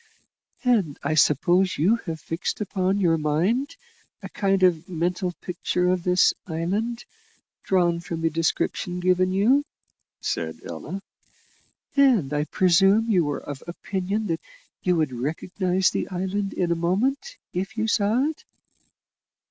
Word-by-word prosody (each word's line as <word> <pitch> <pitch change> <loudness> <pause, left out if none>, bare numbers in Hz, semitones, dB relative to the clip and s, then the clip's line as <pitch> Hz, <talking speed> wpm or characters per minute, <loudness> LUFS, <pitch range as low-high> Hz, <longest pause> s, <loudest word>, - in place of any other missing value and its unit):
"And 210 - +2
I 145 - 0
suppose 175 +5 +3
you 195 +10 +3
have 160 -1 -3
fixed 165 +3 -3
upon 195 -2 0
your 165 -4 +2
mind 180 - 0 0.5
a - - -6
kind 195 -2 +1
of 175 -2 +2
mental 180 +2 -1
picture 180 0 -1
of 180 -1 +1
this 180 0 +4
island, 200 +9 -2 0.6
drawn 175 -3 +2
from 165 -1 -5
the 165 0 +1
description 165 +2 -1
given 185 +1 +2
you," 230 +10 +3 0.6
said - - -3
Ella; 195 +1 -6 0.9
"and 245 - +4
I 150 0 0
presume 195 +7 +3
you 175 -7 +3
are 145 - -3
of 145 -2 -7
opinion 190 +4 -3
that 165 -5 -2 0.4
you 180 -2 +2
would 155 -5 0
recognise 180 - 0
the - - -2
island 190 +2 -2
in 175 -2 0
a - - +3
moment, 275 - -1 0.2
if 195 +5 -4
you 220 0 0
saw 215 +4 +2
it?" 305 +1 -3
185 Hz, 140 wpm, -24 LUFS, 165-205 Hz, 0.9 s, this